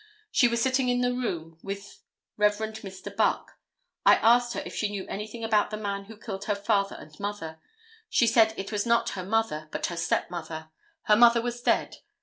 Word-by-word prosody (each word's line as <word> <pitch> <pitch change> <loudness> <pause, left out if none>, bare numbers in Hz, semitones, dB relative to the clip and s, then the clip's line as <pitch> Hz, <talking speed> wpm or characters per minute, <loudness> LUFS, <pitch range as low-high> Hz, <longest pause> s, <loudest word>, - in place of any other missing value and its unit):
She 245 - +5
was 235 0 0
sitting 260 +1 +2
in 245 0 +1
the 245 0 +1
room 165 -10 -4
with 200 0 -7 0.3
Rev. 210 0 +4
Mr. 215 -3 -7
Buck. - - +1 0.5
I - - +7
asked 240 +1 +4
her - - -3
if - - -7
she 210 - -1
knew 200 -2 -5
anything 215 +3 -6
about 215 -2 +2
the 215 - -4
man 200 -2 -3
who 220 +1 -12
killed 200 -2 -6
her 205 - 0
father 200 -1 0
and 155 - -12
mother? 200 -6 -5 0.5
She 235 - +4
said 225 -1 +4
it 195 +2 -5
was 210 +1 -1
not 235 0 +3
her 185 - -5
mother, 185 -7 -1
but - - -2
her 175 - -4
step 170 - 0
mother. 160 -2 -6 0.3
Her 210 - +5
mother 235 +1 +6
was 240 0 -3
dead. - - +1
210 Hz, 200 wpm, -27 LUFS, 195-235 Hz, 0.5 s, I